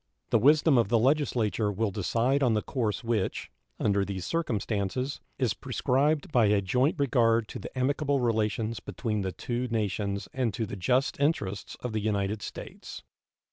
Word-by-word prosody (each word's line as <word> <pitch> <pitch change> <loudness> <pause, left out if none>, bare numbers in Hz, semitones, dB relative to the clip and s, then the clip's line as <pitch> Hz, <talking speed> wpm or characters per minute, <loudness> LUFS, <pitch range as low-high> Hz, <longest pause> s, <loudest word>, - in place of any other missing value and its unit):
The 115 - +5
wisdom 145 +2 +5
of 115 - +1
the 120 - +4
Legislature 115 - +1
will 105 +1 -1
decide 115 +8 +1
on 120 -5 +3
the 105 - 0
course 115 -4 -2
which, 115 -4 -1 0.3
under 100 -1 +2
these 95 -2 -4
circumstances, 120 - -2 0.2
is 125 -7 +1
prescribed 140 +3 0
by 120 -6 +4
a 105 0 +4
joint 125 - +1
regard 115 -5 +2
to - - -6
the - - -9
amicable 140 +2 +1
relations 110 -1 0
between 110 -4 -3
the 95 -1 -2
two 120 +8 -3
nations 100 -3 -2
and 125 -6 -1
to 115 - -1
the 100 - -6
just 125 +9 +1
interests 110 -10 -1
of 125 -3 -4
the 110 - -1
United 105 0 -1
States. - - -8
115 Hz, 165 wpm, -28 LUFS, 105-130 Hz, 0.3 s, The